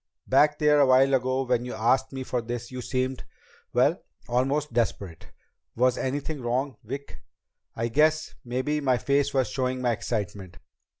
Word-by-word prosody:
"Back 145 +3 +4
there 150 -1 +4
a 140 - +6
while 130 +1 +5
ago, 130 +1 +1
when 125 -2 0
you 125 - -5
asked 130 +4 +1
me 135 -1 -5
for 125 -1 -2
this, 120 +1 -6
you 125 0 -5
seemed 130 +1 -2 0.5
well, - - +2 0.3
almost 135 +3 0
desperate. 100 -7 -2 0.5
Was 125 +1 +3
anything 145 +2 -3
wrong, 125 +1 -1
Vic?" 135 +6 -7 0.5
"I 115 +1 -1
guess 155 +6 +2
maybe 130 +5 -1
my 130 -3 +2
face 140 +4 +1
was 130 -2 +1
showing 130 -1 -1
my 125 -1 +1
excitement." 100 -5 -4
130 Hz, 160 wpm, -26 LUFS, 120-140 Hz, 0.5 s, a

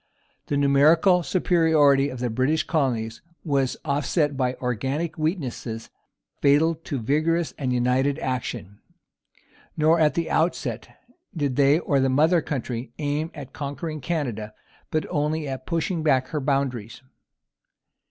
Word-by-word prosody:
The 145 - 0
numerical 155 +6 +4
superiority 155 -4 +3
of 130 - -7
the 125 -1 -2
British 130 +7 +1
colonies 120 -7 -1 0.2
was 140 -4 0
offset 145 +1 0
by 130 -1 0
organic 135 +7 -2
weaknesses 135 - -3 0.5
fatal 145 +4 +4
to 160 -3 -6
vigorous 155 +7 0
and 130 -3 -1
united 125 +3 +1
action. 125 -8 -4 1.0
Nor 160 +2 +4
at 155 -2 +3
the 170 -1 -1
outset 125 - -1 0.5
did 140 -4 -1
they, 140 +2 +4
or 145 -5 +1
the 135 0 +2
mother 160 +6 +3
country, 125 -4 -4
aim 150 +2 -2
at 140 -3 -9
conquering 150 +2 -5
Canada, 120 -9 -3 0.3
but 155 - -1
only 150 +1 -1
at 130 -1 -6
pushing 170 0 -1
back 130 -4 +2
her 150 - -2
boundaries. 130 -4 -2
140 Hz, 130 wpm, -24 LUFS, 130-155 Hz, 1.0 s, numerical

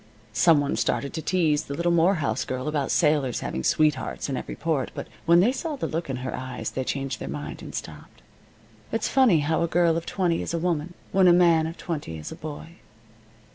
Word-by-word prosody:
Some 165 +3 +5
one 145 0 -1
started 140 - -1
to 160 - -3
tease 160 -4 +1
the 140 - -5
little 170 +2 +1
Morehouse 170 -2 +2
girl 130 +1 -4
about 150 -3 -1
sailors 150 -6 +2
having 65 - -3
sweethearts 150 - +1
in 135 - -1
every - - -5
port, 155 -6 -1
but - - -5 0.2
when 170 +1 +7
they 225 +7 +4
saw 300 +3 -3
the 270 - -3
look 165 -1 -3
in 135 - -1
her 130 - -3
eyes 130 0 -5
they 130 - -2
changed 135 0 -3
their 65 - -6
mind, 70 +1 -6
and - - -8
stopped. - - -8 0.7
It's 225 -1 0
funny 245 - +4
how 160 +2 0
a 170 - +2
girl 170 -1 +3
of 165 - -5
twenty 175 -4 0
is - - -3
a - - +1
woman, 170 0 -1 0.2
when 190 -1 +5
a - - +8
man 170 -2 +4
of 165 - -7
twenty 145 - -5
is 75 - -7
a - - -6
boy. 155 +2 -8
160 Hz, 215 wpm, -25 LUFS, 140-175 Hz, 0.7 s, a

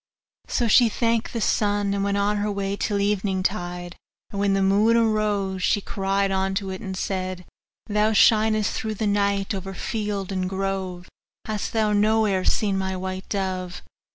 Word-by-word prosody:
So 240 - 0
she 235 +1 +6
thanked 230 +1 0
the 230 - -3
sun, 205 -1 +1
and 200 0 -1
went 200 0 0
on 205 +1 +1
her 205 0 -1
way 200 0 -2
till 205 0 -1
eventide; 185 -3 -1 0.4
and 200 - -4
when 200 -1 +2
the 195 - +2
moon 210 +4 +4
arose, 210 -4 +1
she 205 - +2
cried 195 0 -1
unto 190 0 -1
it, 185 - -6
and 190 -4 -5
said, 185 -2 -3 0.4
'Thou 210 +1 +1
shinest 215 0 +4
through 220 -1 -3
the 215 - -2
night, 200 -1 +1
over 195 0 -5
field 205 -2 -3
and 185 -1 -1
grove 190 -2 -3 0.4
hast 215 -2 -3
thou 215 -2 +2
nowhere 210 -2 +2
seen 200 -1 +1
my 190 0 -2
white 185 0 -5
dove? 185 -3 -3
200 Hz, 165 wpm, -24 LUFS, 190-210 Hz, 0.4 s, she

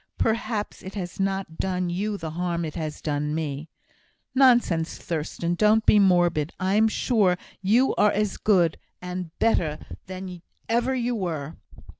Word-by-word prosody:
"Perhaps 225 -2 -1
it 190 +2 -9
has 180 -3 -5
not 195 -4 -2
done 180 -2 -1
you 205 +4 -2
the 160 -4 -5
harm 170 0 -2
it 155 - -5
has 155 -3 -5
done 150 0 -1
me." 155 -1 -4 0.6
"Nonsense! 240 -11 +3
Thurstan. 170 +1 -3
Don't 215 +4 +3
be 210 - +6
morbid. 175 -5 +3
I'm 200 +4 +3
sure 210 -5 +2 0.2
you 225 +7 +3
are 210 - +5
as 210 -1 -1
good 175 -6 +2 0.2
and 180 -1 -5
better 160 -9 +1 0.3
than 185 -1 -7 0.3
ever 240 +3 +1
you 245 -1 -1
were." 165 -8 -3
185 Hz, 145 wpm, -25 LUFS, 165-210 Hz, 0.6 s, be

